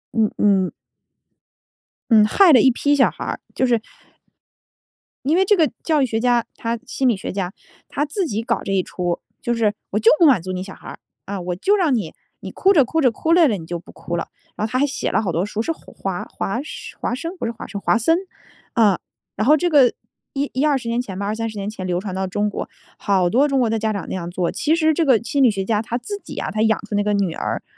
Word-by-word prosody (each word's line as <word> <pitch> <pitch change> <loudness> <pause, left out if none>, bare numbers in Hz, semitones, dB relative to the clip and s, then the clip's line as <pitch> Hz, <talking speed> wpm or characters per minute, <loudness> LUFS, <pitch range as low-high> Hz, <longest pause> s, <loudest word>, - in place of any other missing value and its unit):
嗯 220 -2 +2
嗯。 195 -3 +3 1.4
嗯， 215 -2 +7
害 360 - +5
了 250 - +8
一 265 - +6
批 285 +4 +2
小 275 - +4
孩 - - -8
儿， - - -3 0.2
就 260 - +2
是 235 -3 +2 1.4
因 310 +4 +3
为 380 - +4
这 415 0 +4
个 315 -3 +3
教 310 -3 +2
育 - - +4
学 225 -2 -1
家， 240 -1 +2
他 230 0 -2
心 260 0 -1
理 215 - +1
学 - - -5
家。 185 -2 -3 0.4
他 290 - -1
自 350 +3 -2
己 220 +2 -2
搞 - - -1
这 195 - -4
一 190 -2 +2
出， 175 -1 -3 0.2
就 240 - 0
是 215 -2 +1 0.2
我 205 - -1
就 225 - +6
不 335 - +6
满 250 - +5
足 185 +1 -5
你 185 0 -3
小 195 - -10
孩 - - -14
儿， - - -10 0.3
啊， 195 -2 -4
我 175 0 -3
就 400 - +2
让 325 -10 +2
你 185 -8 -3 0.3
你 - - -7
哭 390 - +3
着 280 -7 +5
哭 320 +5 0
着 255 - +5
哭 320 +8 0
累 340 -3 +6
了， 210 -5 0
你 160 - -9
就 175 0 -4
不 175 - -15
哭 170 - -6
了。 170 - -3 0.3
然 215 - -2
后 - - -14
他 255 - 0
还 285 - +4
写 290 +2 -2
了 - - +1
好 190 -5 -2
多 165 +3 0
书 210 +1 -3
是 330 - -1
华 195 - -5
华 230 +5 -3 0.4
华 - - -1
生， 330 +6 -5
不 - - -4
是 230 - -1
华 230 - -9
生 200 -1 -6
华 - - +2
森。 325 +9 +3 0.6
啊， 210 -6 +3 0.4
然 215 +4 -1
后 305 +1 +6
这 350 - 0
个 275 -6 +5 0.4
1 280 +1 -1
10-20 265 -3 +1
年 235 +1 0
前 190 -6 -7
吧， 200 - -3
20-30 220 0 -3
年 200 0 -4
前 190 -4 -6
流 175 0 0
传 190 -1 -5
到 190 0 -2
中 205 +3 -1
国， - - -5 0.3
好 190 -3 +2
多 270 +8 +3
中 275 -2 +1
国 240 - +2
的 225 0 0
家 220 0 0
长 200 - -4
那 - - -4
样 175 -2 -4
做。 175 -1 -1
其 310 +2 +1
实 315 -1 +3
这 330 - +1
个 260 -5 +5
心 280 +2 0
理 245 - +6
学 195 -2 -2
家 215 -1 +1
他 235 +1 -3
自 405 +11 -6
己 - - -9
啊， - - -3
他 215 - -1
养 220 -1 +3
出 210 - -7
那 205 - +2
个 210 0 0
女 195 -5 0
儿， - - -3
225 Hz, 270 characters per minute, -21 LUFS, 195-280 Hz, 1.4 s, 了